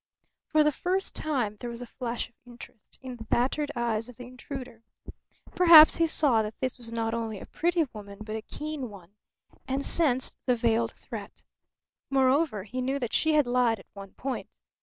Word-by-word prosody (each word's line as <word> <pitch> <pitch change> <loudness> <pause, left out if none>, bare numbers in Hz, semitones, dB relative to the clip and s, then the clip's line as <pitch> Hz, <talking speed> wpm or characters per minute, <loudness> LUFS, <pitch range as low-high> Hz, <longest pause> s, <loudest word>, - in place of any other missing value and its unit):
For 310 -1 +3
the 300 - +3
first 370 +6 -2
time 245 -9 -1
there 240 - -5
was 235 +1 -6
a - - -7
flash 240 0 -4
of - - -31
interest 240 -2 -13
in 255 -2 -7
the 225 - -9
battered 270 +6 0
eyes 230 -1 -1
of 245 - -13
the 250 - -9
intruder. 250 -1 -9 0.7
Perhaps 335 -3 +9
he 330 - +3
saw 275 -8 +3
that 215 0 -6
this 260 -1 -3
was 230 -1 -5
not 225 -1 -2
only 225 -3 -3
a - - -9
pretty 340 -1 0
woman 200 -2 -10
but 215 0 -6
a 220 - -4
keen 300 +1 -6
one, 195 -2 -14 0.5
and 270 +1 -1
sensed 265 -6 +3
the 250 - +4
veiled 230 -1 +1
threat. 215 -3 -10 0.7
Moreover, 270 - +2
he 255 +6 -5
knew 265 +2 -1
that 245 -5 -4
she 315 -1 +2
had 300 -2 +4
lied 245 -2 +2
at 190 - -15
one 195 -1 -11
point. 265 0 -5
245 Hz, 190 wpm, -27 LUFS, 225-280 Hz, 0.7 s, Perhaps